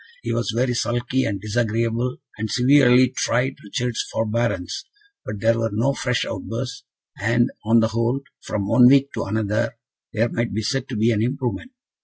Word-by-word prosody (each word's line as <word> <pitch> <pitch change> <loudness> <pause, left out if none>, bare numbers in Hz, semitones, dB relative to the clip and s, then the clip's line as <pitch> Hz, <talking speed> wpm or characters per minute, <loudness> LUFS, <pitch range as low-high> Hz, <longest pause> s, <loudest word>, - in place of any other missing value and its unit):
He 115 - -2
was 115 0 -1
very 125 +3 +1
sulky 120 +2 0
and 100 - -2
disagreeable, 115 +3 -1 0.2
and 110 0 -2
severely 130 0 +5
tried 130 +3 0
Richard's 120 +3 -2
forbearance; 115 - -1 0.4
but 105 - -6
there 115 +1 +3
were 115 0 0
no 115 +7 +1
fresh 125 -3 -1
outbursts, 125 +2 -5 0.4
and, 120 +4 +2
on 115 +1 +5
the 110 - +2
whole, 115 +4 0 0.2
from 100 -2 -3
one 125 +4 +6
week 140 +1 +4
to - - -3
another, 110 +3 -1 0.3
there 115 +2 +1
might 115 -3 -2
be 110 - -1
said 135 +4 -2
to 125 - -4
be 110 +2 +3
an 105 -2 +1
improvement. 130 - -2
115 Hz, 170 wpm, -22 LUFS, 110-125 Hz, 0.4 s, one